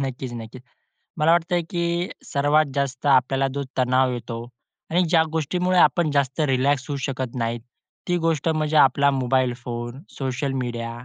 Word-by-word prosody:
नक्कीच, 130 -2 -4
नक्कीच. 120 +2 -8 0.6
मला 160 +2 +4
वाटतंय 175 +1 +1
की 170 0 -1 0.2
सर्वात 145 +2 +2
जास्त 140 0 -2
आपल्याला 135 0 +3
जो 140 - -2 0.2
तणाव 130 0 +2
येतो 115 -1 -5 0.5
आणि 175 +3 +3
ज्या 165 -2 +5
गोष्टीमुळे 180 +4 0
आपण 170 -3 +4
जास्त 140 0 0
रिलॅक्स 135 +1 +1
होऊ 145 - -2
शकत 130 -3 -4
नाही, 115 -1 -2 0.5
ती 175 - +2
गोष्ट 165 -1 +1
म्हणजे 155 -1 0
आपला 140 0 +5
मोबाईल 130 -1 +1
फोन, 120 +2 -5 0.2
सोशल 135 0 -2
मीडिया 120 -1 -4
135 Hz, 150 wpm, -23 LUFS, 125-155 Hz, 0.6 s, ज्या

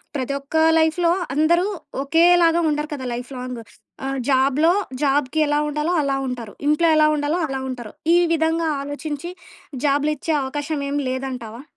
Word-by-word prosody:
ప్రతి 270 0 -2
ఒక్క 280 +3 -10 0.2
లైఫ్‌లో 335 +2 +2 0.2
అందరూ 340 +5 +3 0.4
ఒకేలాగా 335 +2 +4
ఉండరు 300 0 -2
కదా! 260 -3 -5
Life 245 0 -6
long. 250 -2 -6 0.4
ఆహ్, 270 0 -2
జాబ్‌లో 275 +5 +3 0.3
జాబ్‌కి 280 +1 +1
ఎలా 295 0 +1
ఉండాలో 300 +4 -1
అలా 275 -1 0
ఉంటారు. 235 -4 -6
ఇంట్లో 325 +2 +3
ఎలా 305 0 +5
ఉండాలో 295 +4 -1
అలా 270 0 -4
ఉంటారు. 240 -4 -7 0.2
ఈ - - +6 0.2
విధంగా 325 0 +1
ఆలోచించి 295 +3 -5 0.5
జాబ్‌లిచ్చే 295 +2 +1
అవకాశం 290 +2 -3
ఏమీలేదంటావా? 260 -4 -4
290 Hz, 140 wpm, -21 LUFS, 265-320 Hz, 0.5 s, ఈ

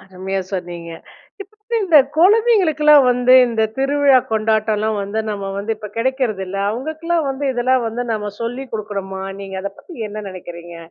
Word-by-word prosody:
அருமையா 190 +1 -4
சொன்னீங்க. 175 -2 -5 0.5
இப்ப 395 - -23
வந்து 465 +2 -3
இந்த 325 -5 +6 0.2
குழந்தைங்களுக்குலாம் 330 - +5
வந்து 250 +1 +4
இந்த 225 -1 0 0.2
திருவிழா 275 -1 +4
கொண்டாட்டம்லாம் 215 -1 0
வந்து, 200 +2 -4
நம்ம 200 -1 -4
வந்து 220 +2 -2
இப்ப 210 -1 -9
கிடைக்கிறதில்ல. 225 -7 -1
அவங்களுக்கெல்லாம் 315 +6 -2
வந்து 275 +1 -3
இதெல்லாம் 245 0 +1
வந்து 240 +2 -4
நாம 210 -1 -3
சொல்லி 245 +4 -4
குடுக்கனுமா? 195 -3 -5 0.2
நீங்க 195 -1 -7
அதை 200 0 -4
பத்தி 350 - -13
என்ன 210 +1 -7
நெனைக்கிறீங்க? 175 -2 -10
225 Hz, 150 wpm, -19 LUFS, 195-280 Hz, 0.5 s, இந்த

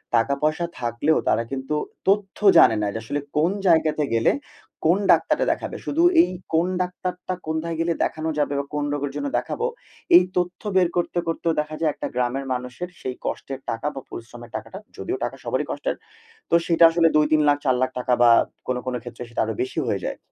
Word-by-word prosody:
টাকা-পয়সা 140 +7 +1
থাকলেও 120 +6 +1
তারা 115 - +2
কিন্তু 135 +2 -3 0.3
তথ্য 200 0 +1 0.2
জানে 110 - +7
না। 105 - 0
যে - - -3
আসলে 145 +6 -2 0.2
কোন 165 +4 +3 0.2
জায়গাতে 155 -3 +3
গেলে, 115 - +3 0.5
কোন 170 +4 +5
ডাক্তারটা - - +3
দেখাবে? - - -4
শুধু 330 +4 +1 0.2
এই - - +1 0.2
কোন 165 +2 +3
ডাক্তারটা, 180 0 -4
কোনথায় 160 +1 -2
গেলে 165 0 +1
দেখানো 160 +1 -2
যাবে? 145 -1 +1
বা 140 - -3
কোন 150 0 -1
রোগের 145 -1 -2
জন্য 285 - -2
দেখাবো? 460 - -2 0.5
এই 180 - +9
তথ্য 180 0 -1
বের 185 -2 +5
করতে, 175 0 -1
করতেও 165 0 0
দেখা 150 +1 -3
যায় 160 -2 +2
একটা - - -5
গ্রামের 125 +2 -1
মানুষের 125 +8 -5
সেই 130 -1 -4
কষ্টের 135 -1 -4
টাকা 115 +6 -2
বা 135 - -5
পরিশ্রমের 120 0 -10
টাকাটা, 190 - -6 0.2
যদিও 375 +3 -3
টাকা - - -3
সবারই - - -1
কষ্টের। - - -2 0.5
তো - - +4
সেটা 170 -1 +3
আসলে 165 0 +4
৳২-৩ 155 0 +4
লাখ 145 - +4
৳৪ 130 -2 +3
লাখ 130 - +2 0.3
বা 120 - +7 0.4
কোনো 125 -1 -1
কোনো 125 -1 -2
ক্ষেত্রে 125 0 -8
সেটা 115 - -2
আরো - - -2
বেশি 385 +1 -2
হয়ে - - 0
যায়। - - -3
155 Hz, 190 wpm, -23 LUFS, 130-175 Hz, 0.5 s, এই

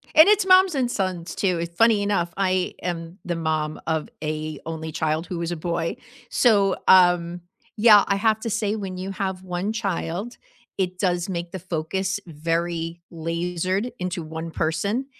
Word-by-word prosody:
And 315 +3 +9
it's 420 -1 +4
moms 370 -2 +6
and 255 -3 +1
sons, 185 -6 -3
too, 185 -4 +1
it's 170 0 -5
funny 225 0 +4
enough, 195 -4 0
I 185 -2 +1
am 170 0 -5
the 175 - -2
mom 155 -2 -1
of 160 +3 -1
a 155 -1 -3
only 160 0 -5
child 155 +2 -1
who 175 -2 -4
is 170 0 -2
a 175 - -1
boy. 165 0 -2 0.3
So, 200 -5 +3
um, 175 -1 +5 0.4
yeah, 210 -2 +7
I 200 - +2
have 215 +2 +2
to 230 - -3
say, 215 -1 0
when 195 -3 -5
you 190 +1 -4
have 190 -1 -3
1 180 +3 -2
child, 200 0 -3 0.4
it 185 -1 -2
does 180 -2 0
make 170 -2 -4
the 190 - -5
focus 185 +3 -2
very 165 +1 -2
lasered 175 +6 -2
into 180 -1 -3
1 160 +1 -6
person, 185 +12 -1
180 Hz, 170 wpm, -24 LUFS, 165-200 Hz, 0.4 s, And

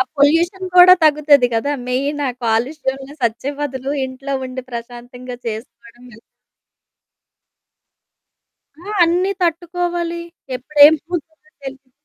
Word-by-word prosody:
ఆ - - +6 0.2
పొల్యూషన్ 340 +6 +2
కూడా 360 +1 +9
తగ్గుతది 295 -4 +4
కదా! 280 +6 0 0.2
మెయిన్ 280 +4 -2
ఆ - - -1
కాలుష్యంలో 265 +4 -2
సచ్చే 235 +4 -1
బదులు, 270 -1 -4 0.2
ఇంట్లో 270 +1 -6
ఉండి 255 0 -7
ప్రశాంతంగా 245 +1 -8
చేసుకోవడం 230 +1 -8
మేలు. 225 0 -16 2.6
ఆ! 415 +3 -7
అన్నీ 355 +3 +1
తట్టుకోవాలి 345 0 -2 0.4
ఎప్పుడు 290 +4 -4
ఏం 310 - +5
పోతుందో 320 -2 -7
తెలిదు. 270 -1 -10
280 Hz, 110 wpm, -18 LUFS, 250-330 Hz, 2.6 s, కూడా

